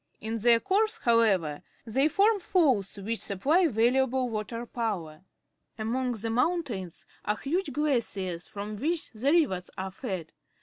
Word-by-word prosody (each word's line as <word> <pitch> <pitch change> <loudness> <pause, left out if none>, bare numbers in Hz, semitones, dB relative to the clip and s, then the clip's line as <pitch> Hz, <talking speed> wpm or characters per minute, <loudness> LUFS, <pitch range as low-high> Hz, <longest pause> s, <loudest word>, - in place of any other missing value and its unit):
In 225 +1 -3
their 235 +1 +5
course, 430 - +1
however, 195 -11 +3 0.2
they 265 +6 +2
form 405 +6 +3
falls. 275 - +2
which 220 +3 -3
supply 295 - +2
valuable 255 +1 +2
water 230 +2 -4
power. 190 -11 -4 0.6
Among 245 +3 -1
the 225 0 -3
mountains 235 - -1 0.2
are 210 0 0
huge 335 - -2
glaciers 230 - -1
from 205 +1 -6
which 320 +8 -1
the 245 +6 0
rivers 235 - +2
are 190 0 -4
fed. 185 - -5
230 Hz, 135 wpm, -28 LUFS, 200-285 Hz, 0.6 s, their